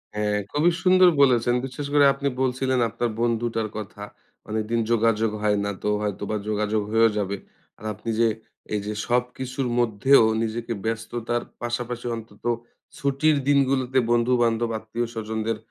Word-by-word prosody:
হ্যাঁ, 105 0 0
খুবই 155 +4 +3
সুন্দর 185 -1 +6
বলেছেন। 120 -3 +4
বিশেষ 135 +2 -6
করে 145 -1 +6
আপনি 140 - -3
বলছিলেন 130 0 +1
আপনার 115 +1 -2
বন্ধুটার 115 -1 0
কথা। 105 -1 -7 0.5
অনেকদিন 110 +2 -1
যোগাযোগ 115 -1 +2
হয় 105 -1 +2
না 100 - -1
তো 105 - +1
হয়তোবা 105 0 -3
যোগাযোগ 105 0 0
হয়েও 115 0 +5
যাবে। 100 -1 -1 0.4
আর 110 - -11
আপনি 115 +4 -7
যে 115 - +5 0.5
এই 105 - +1
যে, 105 - -3
সবকিছুর 125 +2 -1
মধ্যেও 120 +3 +4 0.2
নিজেকে 115 +1 -3
ব্যস্ততার 115 +1 -2 0.2
পাশাপাশি 120 0 -3
অন্তত 110 -2 -11 0.5
ছুটির 140 +3 +2
দিনগুলোতে 135 -2 +2
বন্ধু-বান্ধব 120 -1 +2
আত্মীয় 115 +2 -3
স্বজনদের 110 0 -2
115 Hz, 140 wpm, -24 LUFS, 110-125 Hz, 0.5 s, সুন্দর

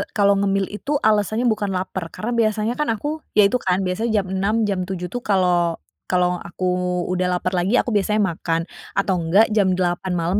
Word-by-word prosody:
kalau 200 -1 +4
ngemil 195 -1 0
itu 275 +8 -3
alasannya 215 +2 +2
bukan 205 -3 -1
laper 185 -2 -3
karena 235 +3 -4
biasanya 220 0 +1
kan 300 - +1
aku 295 +8 -4 0.2
ya 210 - +7
itu 250 - +1
kan 185 -1 0
biasanya 210 +3 0
jam - - -12
6.00 195 +3 0
jam 185 -2 -1
7.00 180 -2 -4
tuh 245 - -3
kalau 180 -4 +2 0.3
kalau 180 -1 +1
aku 180 0 -2
udah 180 0 0
laper 185 +1 -2
lagi 185 +6 +1
aku 245 - +1
biasanya 210 0 +1
makan, 165 0 -2 0.3
atau 185 -3 +1
enggak 195 +7 +3
jam 195 -4 +2
8 180 0 -1
malam 175 +4 0
190 Hz, 190 wpm, -21 LUFS, 180-215 Hz, 0.3 s, ya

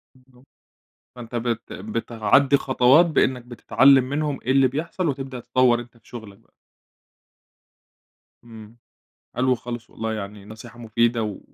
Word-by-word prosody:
بالضبط، 130 0 -25 0.7
فأنت 120 -1 -9
بت 115 -1 -3
بتعدي 115 +6 +1
خطوات 130 +5 +4
بأنك 130 -6 0
بتتعلم 130 +2 +3
منهم 145 -1 -2
إيه 130 - -2
اللي 135 0 +4
بيحصل، 160 +6 -4
وتبدأ 135 -3 -4
تطوّر 125 0 +2
أنت 120 0 -12
في 110 - -27
شغلك 110 -5 -11
بقى. - - -32 1.9
إمم، 110 -1 -14 0.6
حلو 130 +1 +1
خالص 120 -1 -8
والله، 110 0 -5
يعني 100 -1 -8
نصيحة 110 +3 -12
مفيدة 115 0 0
و 105 -3 -5
120 Hz, 130 wpm, -22 LUFS, 115-130 Hz, 1.9 s, خطوات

